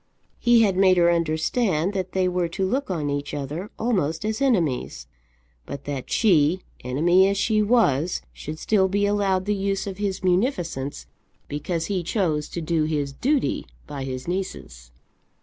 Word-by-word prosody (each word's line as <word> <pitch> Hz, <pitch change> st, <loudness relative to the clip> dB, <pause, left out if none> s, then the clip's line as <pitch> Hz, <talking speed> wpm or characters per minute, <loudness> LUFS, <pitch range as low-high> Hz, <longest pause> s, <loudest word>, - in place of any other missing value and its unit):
He 240 Hz, -1 st, +5 dB
had 195 Hz, -3 st, +2 dB
made 190 Hz, -1 st, +5 dB
her 170 Hz, 0 st, +5 dB
understand 170 Hz, +3 st, 0 dB
that 185 Hz, -2 st, -3 dB
they 185 Hz, -1 st, +2 dB
were 180 Hz, -1 st, 0 dB
to 190 Hz, +3 st, -2 dB
look 260 Hz, +7 st, -1 dB
on 155 Hz, -6 st, -1 dB
each 145 Hz, +1 st, -3 dB
other 150 Hz, +8 st, -5 dB
almost 185 Hz, -7 st, 0 dB
as 220 Hz, +4 st, -2 dB
enemies; 160 Hz, -, 0 dB, 0.6 s
but 140 Hz, 0 st, -6 dB
that 140 Hz, -3 st, -5 dB
she, 180 Hz, -4 st, +3 dB, 0.2 s
enemy 170 Hz, +9 st, +3 dB
as 200 Hz, 0 st, 0 dB
she 215 Hz, +2 st, +2 dB
was, 185 Hz, -, +2 dB
should 155 Hz, +1 st, -7 dB
still 190 Hz, +2 st, +2 dB
be 200 Hz, +2 st, +1 dB
allowed 200 Hz, -2 st, +1 dB
the 210 Hz, -, +1 dB
use 195 Hz, -1 st, -1 dB
of 195 Hz, -1 st, -6 dB
his 195 Hz, -2 st, -2 dB
munificence, 180 Hz, -, -1 dB, 0.4 s
because 165 Hz, +3 st, -3 dB
he 190 Hz, -1 st, -1 dB
chose 165 Hz, -5 st, -1 dB
to 170 Hz, -, -5 dB
do 160 Hz, -1 st, 0 dB
his 145 Hz, -3 st, -2 dB
duty 275 Hz, -, 0 dB, 0.2 s
by 140 Hz, -2 st, -6 dB
his 130 Hz, +1 st, -5 dB
nieces! 60 Hz, -, -5 dB
180 Hz, 165 wpm, -24 LUFS, 150-200 Hz, 0.6 s, He